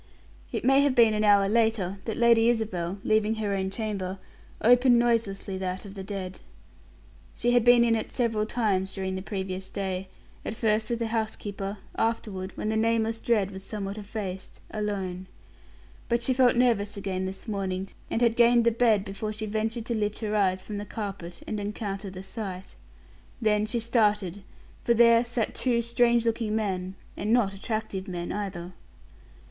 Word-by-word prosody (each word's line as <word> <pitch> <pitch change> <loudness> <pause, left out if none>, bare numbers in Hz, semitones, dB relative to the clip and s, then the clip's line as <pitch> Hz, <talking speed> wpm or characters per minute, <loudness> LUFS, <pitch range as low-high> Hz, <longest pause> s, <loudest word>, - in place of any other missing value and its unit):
It - - -3
may 270 +2 +6
have 280 -2 +2
been 230 -3 +6
an 215 0 0
hour 200 -1 +5
later 215 -3 +1
that 225 - -3
Lady 235 -1 +5
Isabel, 195 -6 -1
leaving 215 0 +2
her 210 -2 -1
own 190 -1 -1
chamber, 195 -3 -3 0.4
opened 245 +2 +5
noiselessly 215 -5 0
that 185 +1 -3
of 195 - -9
the 195 -1 -7
dead. 190 -2 -5 1.0
She 240 - +1
had 245 -1 +4
been 245 0 +7
in 230 -1 +3
it 220 - -3
several 225 -4 0
times 195 -5 0
during 190 -1 -2
the 190 - -3
previous 190 -1 -4
day; 190 -1 -3 0.4
at 220 - -4
first 215 0 +1
with 235 - 0
the 230 -1 -2
housekeeper; 205 -2 -3 0.2
afterward, 205 -4 -1
when 215 - -2
the 220 - 0
nameless 225 0 +1
dread 210 -5 +1
was 190 0 -8
somewhat 200 -2 -5
effaced, 200 -3 -6
alone. 195 -4 -3 0.8
But 235 0 +1
she 260 - +2
felt 250 -1 +4
nervous 225 -5 +2
again 190 -1 -2
this 190 +5 -7
morning, 195 -2 -2 0.2
and 230 - 0
had 230 -1 +3
gained 235 0 +5
the 235 - +5
bed 225 -4 +3
before 205 +2 -4
she 215 +1 -4
ventured 220 +2 -2
to 235 - -2
lift 210 -1 -1
her 215 -1 -1
eyes 185 -2 +2
from 210 -1 -5
the - - -4
carpet 195 -6 -6
and 215 - -3
encounter 200 -1 -4
the 185 0 -8
sight. 190 -2 -6 0.7
Then 215 -2 +2
she 235 +2 -1
started, 210 -5 +1 0.4
for 235 - +3
there 235 0 +6
sat 240 -2 -2
two 245 -2 +1
strange 235 0 +3
looking 225 -2 0
men 190 -3 -2 0.2
and 210 +2 -2
not 230 -5 +3
attractive 205 -1 -4
men 175 -2 -4
either. 185 -3 -4
210 Hz, 175 wpm, -27 LUFS, 195-230 Hz, 1.0 s, been